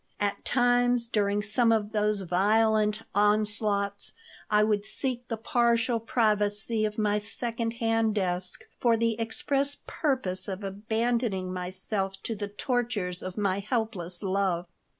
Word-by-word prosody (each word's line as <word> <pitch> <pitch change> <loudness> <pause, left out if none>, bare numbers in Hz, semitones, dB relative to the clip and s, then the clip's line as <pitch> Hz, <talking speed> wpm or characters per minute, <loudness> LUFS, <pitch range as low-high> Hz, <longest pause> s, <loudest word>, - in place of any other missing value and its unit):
At 205 -1 -1
times, 245 -1 +3
during 205 -2 +1
some 230 +3 +2
of 215 -2 +1
those 210 -1 +1
violent 210 +4 +2
onslaughts 205 -1 +1 0.4
I 210 0 +4
would 210 -1 +1
seek 245 +2 -1
the 225 - -3
partial 235 +1 +2
privacy 215 -1 +1
of 210 0 -3
my 210 -1 +2
second 230 +2 -3
hand 225 -2 +1
desk 180 -2 -1 0.2
for 235 -2 +3
the 230 0 +2
express 275 +5 -1
purpose 225 - 0
of 195 0 -5
abandoning 215 -1 -1
myself 190 +2 -2
to 230 - -2
the 205 0 -4
tortures 205 -4 -2
of 185 +1 -6
my 200 -2 +1
helpless 200 -5 -3
love. 190 -3 0
210 Hz, 130 wpm, -28 LUFS, 200-230 Hz, 0.4 s, I